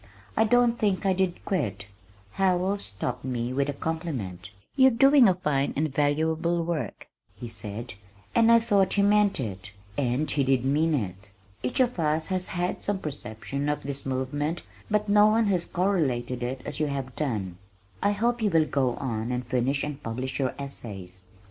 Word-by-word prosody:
I 220 Hz, -, +4 dB
don't 240 Hz, +1 st, +3 dB
think 200 Hz, -2 st, +1 dB
I 190 Hz, -, +4 dB
did 185 Hz, -1 st, -1 dB
quit. 105 Hz, -, -2 dB, 0.5 s
Howells 190 Hz, +1 st, +1 dB
stopped 100 Hz, -1 st, -4 dB
me 125 Hz, -1 st, -2 dB
with 140 Hz, +2 st, 0 dB
a -, -, -1 dB
compliment. 135 Hz, -, -4 dB, 0.3 s
"You're 265 Hz, 0 st, +7 dB
doing 270 Hz, +1 st, +6 dB
a 185 Hz, -, +2 dB
fine 150 Hz, -6 st, 0 dB
and 150 Hz, -1 st, -1 dB
valuable 160 Hz, +4 st, +1 dB
work," 155 Hz, -, -4 dB, 0.3 s
he 120 Hz, -, -7 dB
said, 115 Hz, +1 st, -6 dB, 0.4 s
and 230 Hz, 0 st, +5 dB
I 230 Hz, -, +8 dB
thought 200 Hz, -4 st, +2 dB
he 200 Hz, -, +3 dB
meant 205 Hz, -2 st, +3 dB
it 100 Hz, -5 st, -5 dB, 0.3 s
and 130 Hz, +2 st, +1 dB
he 140 Hz, -, +2 dB
did 130 Hz, -1 st, +2 dB
mean 155 Hz, +4 st, +2 dB
it. 100 Hz, -4 st, -4 dB, 0.3 s
"Each 125 Hz, -, -2 dB
of 250 Hz, -6 st, +2 dB
us 155 Hz, 0 st, +1 dB
has 185 Hz, -1 st, 0 dB
had 180 Hz, 0 st, -2 dB
some 205 Hz, -1 st, 0 dB
perception 140 Hz, -, -4 dB
of 150 Hz, 0 st, -2 dB
this 140 Hz, 0 st, -5 dB
movement 140 Hz, +5 st, -2 dB, 0.2 s
but 210 Hz, 0 st, +1 dB
no 205 Hz, +1 st, +6 dB
one 220 Hz, +1 st, +3 dB
has 185 Hz, -4 st, +1 dB
correlated 145 Hz, -10 st, 0 dB
it 125 Hz, +2 st, -3 dB
as -, -, -5 dB
you 155 Hz, -, +1 dB
have 135 Hz, -3 st, -4 dB
done. 100 Hz, -, -3 dB, 0.4 s
I 205 Hz, -, +2 dB
hope 235 Hz, +3 st, 0 dB
you 215 Hz, -, +3 dB
will 165 Hz, -4 st, +4 dB
go 130 Hz, -4 st, 0 dB
on 115 Hz, -3 st, -3 dB
and 125 Hz, 0 st, -2 dB
finish 130 Hz, +3 st, 0 dB
and 145 Hz, -1 st, -4 dB
publish 130 Hz, +4 st, -4 dB
your 130 Hz, -2 st, 0 dB
essays." 100 Hz, -10 st, -7 dB
145 Hz, 180 wpm, -27 LUFS, 125-190 Hz, 0.5 s, I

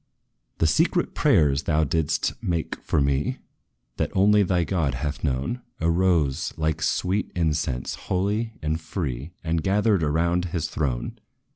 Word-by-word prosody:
"The -, -, +2 dB
secret -, -, +2 dB
prayers, 70 Hz, -3 st, +3 dB
thou 80 Hz, -1 st, +1 dB
didst 80 Hz, 0 st, 0 dB
make 85 Hz, -3 st, -2 dB
for -, -, 0 dB
me, 70 Hz, 0 st, +1 dB, 0.6 s
That -, -, 0 dB
only 105 Hz, +2 st, +5 dB
thy 90 Hz, -3 st, +2 dB
God 80 Hz, -6 st, 0 dB
hath 75 Hz, +3 st, -4 dB
known, 70 Hz, -, -1 dB, 0.2 s
Arose, 85 Hz, -4 st, +1 dB
like 80 Hz, 0 st, -1 dB
sweet 95 Hz, +5 st, 0 dB
incense, 75 Hz, -7 st, -1 dB, 0.2 s
holy 105 Hz, +4 st, 0 dB
and 80 Hz, +2 st, -1 dB
free, 75 Hz, -5 st, -4 dB
And 80 Hz, 0 st, 0 dB
gathered 100 Hz, +1 st, +2 dB
around 85 Hz, +4 st, +1 dB
his 85 Hz, -2 st, -2 dB
throne. 65 Hz, -6 st, -2 dB
80 Hz, 135 wpm, -25 LUFS, 75-90 Hz, 0.6 s, only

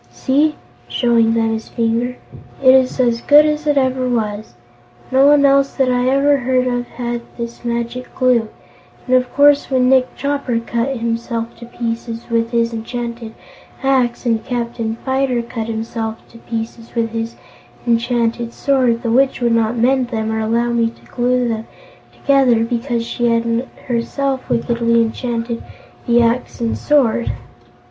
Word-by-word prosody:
See!" 295 Hz, +3 st, +1 dB, 0.3 s
showing 230 Hz, -2 st, +2 dB
them 225 Hz, -1 st, +1 dB
his 220 Hz, 0 st, -5 dB
finger, 235 Hz, +2 st, -1 dB, 0.5 s
"it 260 Hz, -1 st, +8 dB
is 260 Hz, 0 st, +3 dB
as 235 Hz, -2 st, +2 dB
good 295 Hz, +1 st, +6 dB
as 305 Hz, 0 st, -1 dB
ever 260 Hz, -3 st, +1 dB
it -, -, -1 dB
was. 215 Hz, -, -3 dB, 0.6 s
No 265 Hz, +2 st, +5 dB
one 290 Hz, -1 st, +5 dB
else 275 Hz, 0 st, +3 dB
that 260 Hz, -2 st, +2 dB
I 250 Hz, 0 st, +1 dB
ever 280 Hz, +2 st, +3 dB
heard 255 Hz, -1 st, +1 dB
of 245 Hz, -1 st, -1 dB
had 240 Hz, -1 st, -4 dB, 0.2 s
this 235 Hz, 0 st, -6 dB
Magic 235 Hz, +1 st, -3 dB
Glue, 245 Hz, -4 st, +2 dB, 0.6 s
and 255 Hz, -, +2 dB
of 250 Hz, -1 st, +1 dB
course 285 Hz, 0 st, +5 dB
when 255 Hz, -2 st, +2 dB
Nick 260 Hz, -1 st, +3 dB
Chopper 280 Hz, -4 st, -1 dB
cut 235 Hz, +3 st, -2 dB
himself 230 Hz, 0 st, -3 dB
to 235 Hz, 0 st, -11 dB
pieces 230 Hz, 0 st, -5 dB
with 230 Hz, 0 st, +1 dB
his 235 Hz, -1 st, 0 dB
enchanted 235 Hz, 0 st, -5 dB, 0.5 s
axe 260 Hz, -3 st, +1 dB
and 225 Hz, -2 st, +1 dB
Captain 235 Hz, -2 st, -3 dB
Fyter 265 Hz, -2 st, 0 dB
cut 230 Hz, -1 st, -5 dB
himself 225 Hz, 0 st, -4 dB
to 230 Hz, -, -15 dB
pieces 230 Hz, +1 st, -6 dB
with 230 Hz, -1 st, 0 dB
his 225 Hz, 0 st, -4 dB, 0.5 s
enchanted 235 Hz, 0 st, 0 dB
sword, 255 Hz, -4 st, +1 dB
the 230 Hz, -, 0 dB
Witch 265 Hz, +3 st, +3 dB
would 240 Hz, -2 st, +1 dB
not 230 Hz, +1 st, +1 dB
mend 255 Hz, +2 st, +2 dB
them, 220 Hz, -2 st, -2 dB
or 220 Hz, -, -1 dB
allow 230 Hz, +2 st, 0 dB
me 230 Hz, -1 st, +1 dB
to 230 Hz, -, -19 dB
glue 250 Hz, 0 st, 0 dB
them 225 Hz, -1 st, -3 dB, 0.4 s
together, 260 Hz, -5 st, +3 dB
because 235 Hz, 0 st, -2 dB
she 240 Hz, 0 st, -1 dB
had 230 Hz, +1 st, 0 dB, 0.2 s
herself 260 Hz, +2 st, -2 dB
wickedly 235 Hz, 0 st, +1 dB
enchanted 230 Hz, 0 st, -2 dB, 0.5 s
the 240 Hz, 0 st, +4 dB
axe 235 Hz, +2 st, -1 dB
and 230 Hz, -1 st, -1 dB
sword. 225 Hz, -, +2 dB
235 Hz, 155 wpm, -18 LUFS, 230-255 Hz, 0.6 s, it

